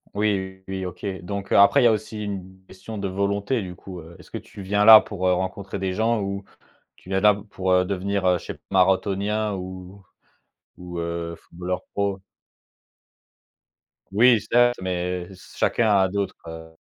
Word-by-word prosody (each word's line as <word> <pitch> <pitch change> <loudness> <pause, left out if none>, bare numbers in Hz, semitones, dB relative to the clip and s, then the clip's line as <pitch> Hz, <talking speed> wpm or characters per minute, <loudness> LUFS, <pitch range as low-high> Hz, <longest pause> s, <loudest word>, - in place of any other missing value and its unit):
Oui, 95 -2 -1
oui, 95 -1 -4
OK, 90 - -9 0.2
donc 100 +2 -6
après 100 +8 +6
il - - +3
y - - +9
a - - +5
aussi 110 0 -3
une 95 -2 -7
question 105 +4 -9
de 100 -1 -2
volonté 100 +5 -1
du 90 -2 -7
coup, 90 0 -10
heu, 80 +2 -13
est-ce 90 - -17
que - - -4
tu 100 - -11
viens 105 +2 +1
là 110 0 +11
pour, 95 -3 -3
heu, 90 - +4
rencontrer 95 +2 -3
des 95 -1 -2
gens 110 +3 +1
ou 100 0 -4 0.5
tu - - -19
viens 95 0 0
là 105 +1 +6 0.2
pour 90 -1 +1
devenir, 100 0 -1
heu, 90 -1 +4
chez - - -7 0.2
marathonien 100 +3 +1
ou 95 +1 -8 0.7
ou 90 -1 -7
heu, 85 0 -4
footballeur 90 +2 -5
pro? 100 -1 -1 1.9
Oui, 115 +2 +5
certes, 120 +2 +3
mais 90 -1 -2
se 95 - -16
chacun 115 - +2
a 95 -1 +4
d'autres 100 +1 -2
heu, 80 0 -9
95 Hz, 170 wpm, -24 LUFS, 90-100 Hz, 1.9 s, là